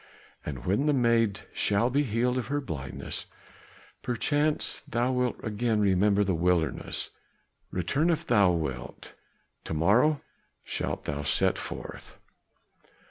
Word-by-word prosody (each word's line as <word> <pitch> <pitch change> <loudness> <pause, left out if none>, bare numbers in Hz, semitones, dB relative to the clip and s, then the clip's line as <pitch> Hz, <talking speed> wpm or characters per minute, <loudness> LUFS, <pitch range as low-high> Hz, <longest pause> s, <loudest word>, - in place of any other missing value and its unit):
And 65 -5 -6
when 105 +11 +1
the 150 - +4
maid 115 -5 +2
shall 105 +5 +2
be 140 +3 +3
healed 125 0 +1
of 120 - -4
her 145 +2 0
blindness, 75 - -5 0.7
perchance 145 +6 0
thou 120 +2 +1
wilt 125 -1 +1
again 110 0 0
remember 100 +1 +3
the 95 -1 0
wilderness; 85 -1 0 0.6
return 135 - 0
if 165 0 0
thou 100 - +5
wilt. 75 -8 -4 0.5
To 80 - -3
morrow 120 - +4 0.5
shalt - - -3
thou 75 0 -2
set 70 -1 +2
forth." - - -8
110 Hz, 125 wpm, -28 LUFS, 90-125 Hz, 0.7 s, thou